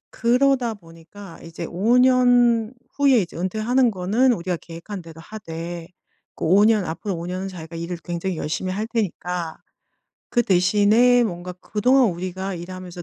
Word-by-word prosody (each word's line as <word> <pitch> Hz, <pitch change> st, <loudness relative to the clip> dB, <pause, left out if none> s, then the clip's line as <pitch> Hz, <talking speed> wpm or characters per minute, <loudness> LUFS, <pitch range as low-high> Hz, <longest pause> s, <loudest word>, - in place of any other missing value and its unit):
그러다 250 Hz, -1 st, +2 dB
보니까 165 Hz, +1 st, -14 dB
이제 165 Hz, 0 st, -7 dB
5 215 Hz, +8 st, +2 dB
년 245 Hz, -2 st, +4 dB, 0.2 s
후에 275 Hz, -4 st, +4 dB
이제 175 Hz, -3 st, -5 dB
은퇴하는 220 Hz, +7 st, +1 dB
거는 210 Hz, +7 st, +2 dB
우리가 175 Hz, -1 st, -3 dB
계획한 170 Hz, +3 st, -8 dB
대로 165 Hz, -1 st, -12 dB
하되 170 Hz, -3 st, -7 dB, 0.5 s
그 -, -, -5 dB
5 195 Hz, +5 st, +5 dB
년 215 Hz, -3 st, +3 dB
앞으로 175 Hz, +3 st, -4 dB
5 170 Hz, +1 st, -6 dB
년은 185 Hz, +2 st, -4 dB
자기가 165 Hz, -2 st, -9 dB
"일을 170 Hz, +1 st, -5 dB
굉장히 175 Hz, +1 st, -3 dB
열심히 170 Hz, +5 st, -3 dB
할 210 Hz, +3 st, -3 dB
테니까 180 Hz, -6 st, -3 dB, 0.7 s
그 240 Hz, -, +2 dB
대신에 210 Hz, +6 st, +4 dB
뭔가 180 Hz, -2 st, -5 dB
그동안 250 Hz, +1 st, +2 dB
우리가 185 Hz, +2 st, -5 dB
일하면서 180 Hz, 0 st, -8 dB
190 Hz, 310 characters per minute, -22 LUFS, 175-230 Hz, 0.7 s, 5